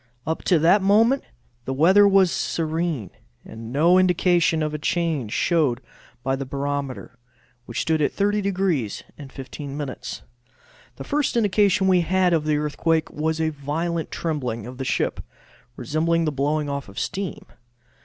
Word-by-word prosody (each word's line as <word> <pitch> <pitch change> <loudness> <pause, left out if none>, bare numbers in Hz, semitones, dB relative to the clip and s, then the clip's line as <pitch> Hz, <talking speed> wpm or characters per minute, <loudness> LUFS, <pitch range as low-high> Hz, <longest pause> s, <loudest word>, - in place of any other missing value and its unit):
Up 160 +1 -2
to 180 - +4
that 170 +6 +4
moment 225 +7 +4 0.4
the 130 - -3
weather 190 +8 +6
was 195 -3 +4
serene, 160 - -2 0.3
and 115 +1 -9
no 170 +7 +4
indication 175 -3 +2
of 155 0 -2
a 150 - -3
change 155 -8 -1
showed 150 -7 +1 0.4
by 135 0 0
the 135 - -4
barometer, 140 -2 -4 0.5
which 120 - -3
stood 160 -1 +1
at 145 - +2
30 205 +1 0
degrees 185 - -1 0.3
15 140 +1 -8
minutes. 145 -3 -6 0.7
The - - -8
first 290 -4 0
indication 205 -3 +3
we 185 -2 +4
had 180 +1 +2
of 155 -2 +1
the 150 -1 +1
earthquake 155 +2 0
was 160 +1 -2
a 160 0 +1
violent 155 +3 -3
trembling 125 -9 -3
of 125 +2 -9
the 135 - -3
ship, - - -1 0.5
resembling 165 +6 0
the 155 - 0
blowing 145 +2 -1
off 140 -5 -4
of 100 - -15
steam. 195 +1 -4
160 Hz, 155 wpm, -23 LUFS, 140-180 Hz, 0.7 s, weather